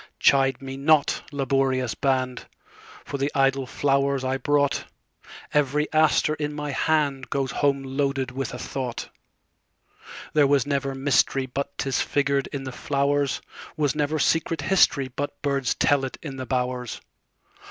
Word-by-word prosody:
Chide 135 -1 +3
me 135 0 -6
not, 150 +1 +3
laborious 135 -3 0
band, 130 -2 -1 0.6
For 140 - -5
the 140 +2 0
idle 135 -1 +2
flowers 140 0 +1
I 130 +1 0
brought; 145 0 +1 0.7
Every 150 +1 +2
aster 155 -1 +3
in 150 -1 -3
my 150 -1 -3
handGoes 140 -2 0
home 140 -1 +1
loaded 135 -1 -1
with 135 0 -4
a 125 - -6
thought. 125 -1 -5 1.2
There 150 -2 +5
was 140 -1 +3
never 140 -1 -1
mysteryBut 135 0 +1
'tis 135 -2 0
figured 140 -1 0
in 140 -1 -5
the 130 - -5
flowers; 140 +1 0 0.3
SWas 145 -3 +1
never 150 +1 0
secret 165 0 +1
historyBut 145 -5 +2
birds 140 -4 0
tell 145 -2 +2
it 135 - -4
in 140 -4 -6
the 130 -1 -5
bowers. 125 -1 -2
140 Hz, 135 wpm, -25 LUFS, 135-145 Hz, 1.2 s, There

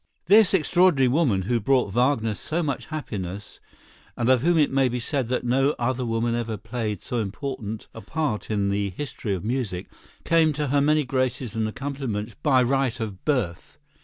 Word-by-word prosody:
This 200 +1 +6
extraordinary 175 -4 +4
woman, 125 - +2
who 120 +4 0
brought 125 -3 +1
Wagner 120 -3 +2
so 160 - -2
much 140 -3 -3
happiness 105 - -6 0.6
and 120 +1 +1
of 130 -2 +4
whom 170 +3 +3
it 150 -2 +3
may 135 -1 +3
be 125 +1 -2
said 130 +1 -1
that 125 +1 -1
no 135 +4 +2
other 125 +1 -1
woman 115 0 0
ever 115 -2 -2
played 110 -2 -4
so 120 - -2
important 110 0 -5
a 115 - -9
part 135 -1 -2
in 100 -2 0
the 100 0 0
history 105 -1 -4
of 95 - -6
music, 115 -7 -3 0.3
came 160 -2 +3
to 145 -1 -2
her 140 +1 +3
many 150 0 +3
graces 130 -3 -1
and 110 -1 0
accomplishments 130 -4 -4
by 130 -4 +4
right 130 -1 0
of 105 -4 -5
birth. 125 - -1
125 Hz, 180 wpm, -25 LUFS, 110-140 Hz, 0.6 s, This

